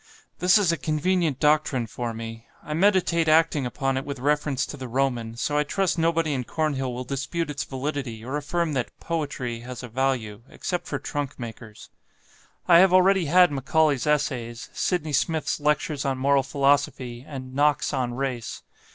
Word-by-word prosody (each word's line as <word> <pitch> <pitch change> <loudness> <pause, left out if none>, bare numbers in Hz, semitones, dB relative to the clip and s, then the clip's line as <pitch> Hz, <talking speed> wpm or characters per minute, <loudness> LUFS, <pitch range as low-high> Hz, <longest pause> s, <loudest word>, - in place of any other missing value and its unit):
This 180 +4 +5
is 195 -5 +3
a 170 - -1
convenient 155 +1 0
doctrine 150 -5 +2
for 120 +1 -4
me 115 0 -8 0.2
I 150 - -5
meditate 175 -2 +3
acting 155 -4 +3
upon 135 +1 -1
it 135 - -2
with 140 0 -5
reference 145 0 0
to - - -7
the 130 -2 -7
Roman, 120 -3 -1
so 145 +5 0
I - - +3
trust 185 +3 0
nobody 165 -2 +1
in 130 -2 -1
Cornhill 135 -2 -1
will 125 +1 -4
dispute 140 +5 -3
its 140 -2 -3
validity 130 -4 -4
or 130 +3 -3
affirm 155 +2 -1
that 125 -3 -3
'poetry' 145 -8 -3
has 125 +2 -8
a - - -5
value, 120 -3 -1
except 180 -1 -4
for 140 - -2
trunk 145 +1 -4
makers. 115 -2 -9 0.8
"I 170 -1 +8
have 190 0 +6
already 185 -1 +5
had 180 +3 +5
'Macaulay's 145 +1 +1
Essays,' 120 -6 -1
'Sidney 160 -5 -1
Smith's 150 +1 0
Lectures 150 -1 0
on 135 -1 -1
Moral 140 +1 +3
Philosophy,' 135 -3 0
and 130 -3 -8
'Knox 145 +1 +2
on 120 -2 -1
Race.' 125 -4 -4
140 Hz, 170 wpm, -25 LUFS, 125-155 Hz, 0.8 s, I